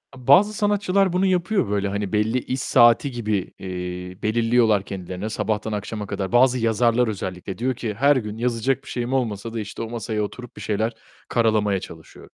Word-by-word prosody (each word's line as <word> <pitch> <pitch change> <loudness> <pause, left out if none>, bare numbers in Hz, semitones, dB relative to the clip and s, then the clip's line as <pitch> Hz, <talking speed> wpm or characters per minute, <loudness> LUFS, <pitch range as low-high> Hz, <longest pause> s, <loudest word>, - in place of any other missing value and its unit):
E, 125 -2 -14
bazı 200 +10 +6
sanatçılar 200 -3 +1
bunu 185 +2 +2
yapıyor 185 - +1
böyle, 100 -1 0
hani, 100 +1 -3
belli 110 +3 +1
iş 130 +1 -4
saati 120 +2 +4
gibi, 110 -6 -2
eee, 90 0 -6
belirliyorlar 115 -2 +3
kendilerine 95 +1 -5
sabahtan 110 0 -2
akşama 105 0 -4
kadar. 95 -1 -3
Bazı 125 +1 +4
yazarlar 115 +1 +2
özellikle 95 -2 -5
diyor 125 +2 -1
ki, 115 -2 -4
"Her 140 +7 +4
gün 110 -4 -3
yazacak 125 +3 0
bir - - -12
şeyim 120 +1 -3
olmasa 115 -3 -2
da 115 - -3
işte 105 +1 -6
o 115 - -4
masaya 115 -2 -3
oturup 120 +3 -8
bir - - -9
şeyler 110 +2 -1 0.3
karalamaya 110 -4 +2
çalışıyorum." 80 -2 -13
115 Hz, 180 wpm, -23 LUFS, 105-125 Hz, 0.3 s, bazı